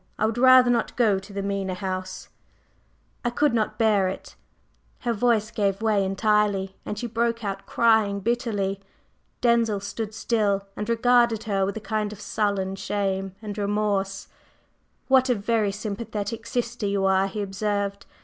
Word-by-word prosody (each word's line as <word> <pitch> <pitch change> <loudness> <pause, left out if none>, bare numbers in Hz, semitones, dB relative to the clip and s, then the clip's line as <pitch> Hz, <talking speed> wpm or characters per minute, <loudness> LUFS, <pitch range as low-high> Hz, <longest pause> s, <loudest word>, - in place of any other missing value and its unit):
I 215 - +1
would 225 +2 -1
rather 255 -1 +7
not 240 - 0
go 215 -6 +3
to 195 +2 -13
the 200 0 -4
Mena 195 -2 -2
House, 185 0 -5 0.9
I 240 - +1
could 285 +2 +1
not 220 -2 0
bear 210 -4 +3
it 190 - -6 0.3
…" - - -39
Her 240 -2 0
voice 225 -1 +1
gave 200 -2 0
way 210 -3 +2
entirely, 195 -1 +1
and 210 - -3
she 240 - -4
broke 235 0 -1
out 195 -1 -4
crying 220 -3 +3
bitterly. 205 -3 -1 0.6
Denzil 235 -4 +3
stood 210 +2 -5
still 205 -4 0
and 210 +2 -4
regarded 235 -1 +3
her 195 -2 0
with 200 - -3
a - - -6
kind 215 0 -2
of 210 - -10
sullen 200 -2 -1
shame 195 -2 -2
and 205 -1 -5
remorse. 200 -1 -1 0.8
"What 265 -1 +4
a 250 - +3
very 210 0 0
sympathetic 210 +2 -5
sister 235 -3 -2
you 200 -1 0
are!" 190 0 +3
he 205 +1 -4
observed. 200 0 -2
210 Hz, 160 wpm, -25 LUFS, 195-230 Hz, 0.9 s, rather